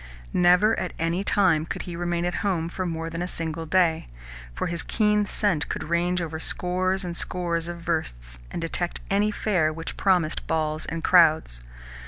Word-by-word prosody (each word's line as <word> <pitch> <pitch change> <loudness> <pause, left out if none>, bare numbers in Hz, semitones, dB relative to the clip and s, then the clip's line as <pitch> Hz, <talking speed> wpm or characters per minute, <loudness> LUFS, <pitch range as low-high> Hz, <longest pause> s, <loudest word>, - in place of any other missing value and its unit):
Never 180 +5 +5
at - - -3
any 165 +4 0
time 185 -7 +3
could - - -4
he 175 - -6
remain 175 0 -1
at 175 - -1
home 170 -5 0
for 185 +1 -3
more 165 -1 -3
than 165 +1 -4
a 180 - -2
single 165 -2 -4
day, 165 -2 +2 0.5
for - - -2
his 170 -1 -2
keen 210 0 +1
scent 185 -9 0
could - - -3
range 175 +2 0
over 160 -1 -5
scores 185 +3 0
and 175 -1 -4
scores 170 -2 -1
of 170 0 -6
versts, - - -3
and - - -5
detect 170 +1 -2
any 205 +2 +3
fair 185 -7 +1
which 165 +1 -6
promised 180 -5 +1
balls 155 -1 -1
and 165 -1 -4
crowds. 160 - +4
170 Hz, 180 wpm, -25 LUFS, 160-180 Hz, 0.5 s, Never